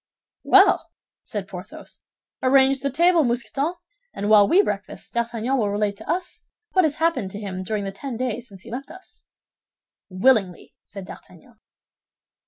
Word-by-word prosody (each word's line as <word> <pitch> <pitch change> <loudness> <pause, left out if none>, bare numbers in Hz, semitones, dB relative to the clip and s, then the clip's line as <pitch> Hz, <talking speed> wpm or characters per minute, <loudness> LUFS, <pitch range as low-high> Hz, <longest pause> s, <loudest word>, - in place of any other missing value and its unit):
"Well," - - +5 0.3
said - - -5
Porthos, - - -10 0.4
"arrange 270 +1 +4
the 280 +2 -1
table, 340 +4 +3
Mousqueton, 270 +6 -1 0.4
and 205 +1 -2
while 205 -2 +7
we 385 - +5
breakfast, 205 - -5
D'Artagnan 235 +2 -1
will 210 -3 +1
relate 205 0 -1
to 220 - -13
us 360 +2 -3 0.3
what 370 -2 +4
has 295 -2 0
happened 315 - 0
to 200 - -7
him 190 -3 -5
during 205 +2 -3
the 195 - -4
ten 240 +5 -6
days 250 -1 -3
since 195 -4 -14
he 230 - -11
left 265 +3 -6
us." 375 - -15 0.8
"Willingly," 190 -2 +1
said 195 -2 -9
D'Artagnan. 200 +6 -14
235 Hz, 155 wpm, -23 LUFS, 205-275 Hz, 0.8 s, while